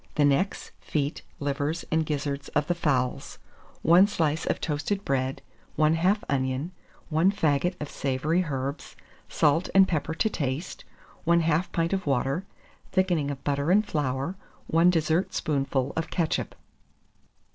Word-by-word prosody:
The 145 - +4
necks, 145 +8 0
feet, 145 -1 -2 0.2
livers, 145 +3 -2
and 160 -1 +2
gizzards 145 -2 -3
of 150 - +2
the 175 - +1
fowls, 135 -7 -1 0.5
1 175 +5 +7
slice 160 -6 -1
of - - 0
toasted 160 +7 -2
bread, 135 -1 -1 0.3
1/2 165 +7 +3
onion, 130 +4 -1 0.4
1 165 +4 +3
faggot 165 -1 +1
of 150 - -4
savoury 145 +7 0
herbs, 140 0 -4 0.3
salt 155 +4 +2
and 190 0 +7
pepper 160 -1 -2
to 220 - +1
taste, 150 -3 -3 0.4
1/2 170 0 +2
pint 165 +2 0
of 190 -4 -2
water, 135 +7 0 0.4
thickening 175 -6 +1
of 140 -2 -6
butter 140 +1 0
and 210 +4 +4
flour, 140 +1 -2 0.3
1 165 +2 +4
dessertspoonful 155 -5 0
of 165 - -2
ketchup. 165 -3 -1
155 Hz, 135 wpm, -27 LUFS, 140-175 Hz, 0.5 s, 1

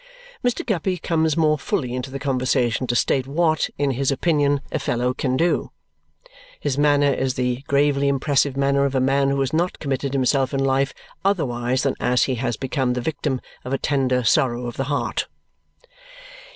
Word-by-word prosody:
Mr. 245 -1 0
Guppy 190 -4 -1
comes 160 -2 0
more 155 -2 +3
fully 125 -3 -2
into 125 +1 -4
the 135 - -5
conversation 130 -2 0
to 120 - 0
state 130 +2 +1
what, 155 +2 +1
in 140 -1 +1
his 135 +1 0
opinion, 145 -1 +1
a - - -1
fellow 125 +1 0
can 130 0 -1
do. 170 +3 +1 0.9
His 140 -3 -1
manner 145 -1 +3
is 130 -1 -1
the 125 0 -1
gravely 140 0 +2
impressive 140 0 +1
manner 140 0 +2
of 140 -1 -1
a - - +3
man 135 +1 +2
who 140 0 0
has 135 - -1
not 175 +3 0
committed 140 -1 -2
himself 135 0 +1
in - - 0
life 135 +1 +1 0.3
otherwise 130 -10 0
than 135 - +1
as 125 0 +2
he 130 - 0
has 120 -4 -1
become 130 -1 -1
the 125 - -2
victim 145 -1 -2 0.2
of 130 - -4
a - - +2
tender 130 -3 0
sorrow 120 +1 +2
of 120 - -5
the 135 - -2
heart. 145 +1 -1
135 Hz, 180 wpm, -22 LUFS, 130-145 Hz, 0.9 s, more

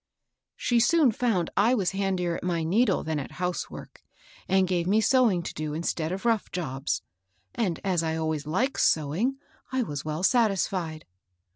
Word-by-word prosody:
" - - -60
She 240 -1 +1
soon 280 +2 +4
found 210 -7 0
I 230 +5 +4
was 190 -7 0
handier 190 -3 -1
at - - -6
my 170 -2 0
needle 210 +10 +2
than 160 -1 -2
at 135 - -7
housework, 180 0 -5 0.5
and 190 -1 +3
gave 175 -1 0
me 210 +3 +4
sewing 220 -7 +3
to - - -5
do 155 0 -4
in 165 - -3
stead 160 -1 -1
of 195 +4 -5
rough 225 -3 +1
jobs; 140 -5 -3 0.5
and, 185 -8 -1
as 185 -4 +1
I 160 -1 -1
always 160 -2 -2
liked 240 - 0
sew 150 -2 +2
ing, 250 - 0 0.3
I 260 -1 +1
was 145 -9 -5
well 155 +3 -3
satisfied. 190 -8 +1
180 Hz, 180 wpm, -27 LUFS, 160-225 Hz, 0.5 s, soon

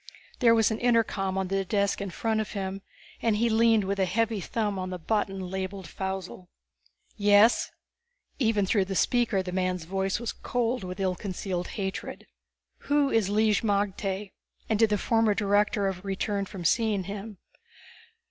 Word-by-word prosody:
There 230 -3 +6
was 225 0 +3
an 220 - -2
intercom 220 -5 +1
on 190 -1 -1
the 195 0 0
desk 200 0 0
in 200 - -3
front 220 +4 -1
of 215 - -6
him 195 -1 -4 0.4
and 225 -2 +2
he 230 +1 +2
leaned 225 -1 +4
with 200 +1 -2
a 190 - +3
heavy 225 +2 0
thumb 205 -1 -2
on 185 0 -3
the 180 - -4
button 195 +2 -1
labeled 190 0 -4
Faussel. 190 -1 -5 0.7
"Yes?" 205 +2 +5 0.7
Even 220 -6 +2
through 195 0 +2
the 195 0 -4
speaker 230 -3 +2
the 180 - -5
man's 185 -1 -1
voice 190 +3 -1
was 235 - -3
cold 245 -2 -2
with 185 0 -6
ill 190 -1 +1
concealed 185 -2 -4
hatred. 190 -1 -4 0.6
"Who 285 -1 +3
is 220 -4 +2
Lig 215 0 +3
magte? 200 -1 -1 0.4
And 220 -2 0
did 225 -1 +5
the 210 - +2
former 225 0 +2
director 205 0 +2
ever 190 -2 -2
return 200 +1 -2
from 190 -4 -8
seeing 215 0 +2
him?" 205 +2 -7
200 Hz, 165 wpm, -27 LUFS, 190-220 Hz, 0.7 s, There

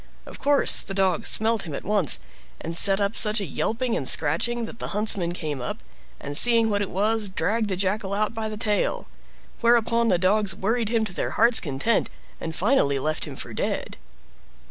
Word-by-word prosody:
Of - - -11
course 285 0 +3
the 195 - -7
dogs 190 -3 0
smelt 220 0 +2
him 150 - -6
at - - -7
once, 200 -7 +1 0.4
and 165 +1 -6
set 195 +3 +6
up 200 +2 -1
such 215 0 +5
a 200 - -4
yelping 225 - -2
and 130 - 0
scratching 230 +11 +1
that 225 - -11
the - - -4
huntsman 200 -5 0
came 155 -6 -5
up, 125 - -5 0.4
and 145 +1 -6
seeing 230 +3 +5
what 205 0 -1
it 200 - -3
was, 210 +2 0
dragged 215 +3 -2
the 190 - -2
Jackal 195 +1 -2
out 215 +2 -1
by 220 -1 -4
the 215 - -7
tail. 210 -1 -1 0.5
Whereupon 235 0 +2
the 185 -5 +2
dogs 190 +1 +1
worried 225 +2 -2
him 225 -1 0
to 200 - -5
their - - -3
heart's 230 +1 +5
content, 150 +10 -1 0.3
and 160 -1 -6
finally 185 - +1
left 155 +3 -2
him - - -9
for - - -7
dead. - - -4
210 Hz, 195 wpm, -23 LUFS, 180-225 Hz, 0.5 s, set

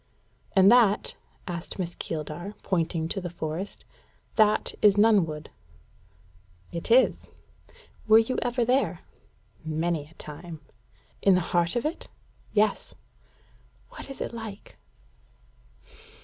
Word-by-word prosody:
"And 195 +1 +6
that," 230 -4 +4 0.3
asked 170 -2 -5
Miss 175 -3 -3
Keeldar, 165 +5 -5
pointing 165 -3 0
to 195 - -3
the 175 - -4
forest 165 +3 -5 0.5
"that 215 -1 +3
is 205 -2 +6
Nunnwood?" 185 -9 +3 1.2
"It 170 +4 -5
is." 250 +3 +4 0.8
"Were 220 0 +8
you 225 +3 +2
ever 245 -1 0
there?" 255 +3 +1 0.6
"Many 160 -1 -1
a 160 - -21
time." 160 +2 -9 0.6
"In 195 -2 +5
the - - +3
heart 170 +2 +2
of 240 - -1
it?" 310 - -3 0.4
"Yes." 215 0 +1 0.9
"What - - -11
is 275 - -8
it - - -4
like?" 220 -3 -8
190 Hz, 115 wpm, -27 LUFS, 165-225 Hz, 1.2 s, Were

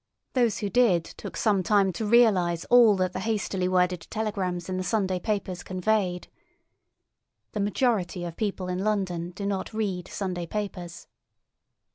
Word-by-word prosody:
Those 240 -4 +2
who 205 - -2
did 225 -9 +4
took - - -9
some 205 -4 +2
time 195 0 +3
to 215 +5 -3
realise 190 -8 +4
all 235 -4 +7
that 185 -1 0
the - - -3
hastily 200 -3 -1
worded 180 -2 +1
telegrams 195 -5 -2
in 185 -1 -2
the 185 - -2
Sunday 185 -1 0
papers 195 -2 -2
conveyed. 185 -1 -1 1.2
The 210 - -4
majority 200 -4 0
of 170 -1 -6
people 195 -4 -2
in 180 0 -2
London 185 -5 -1
do 200 +3 -6
not 200 +2 -3
read 190 -5 -2
Sunday 180 -4 -4
papers. 180 -4 -5
190 Hz, 150 wpm, -26 LUFS, 180-215 Hz, 1.2 s, all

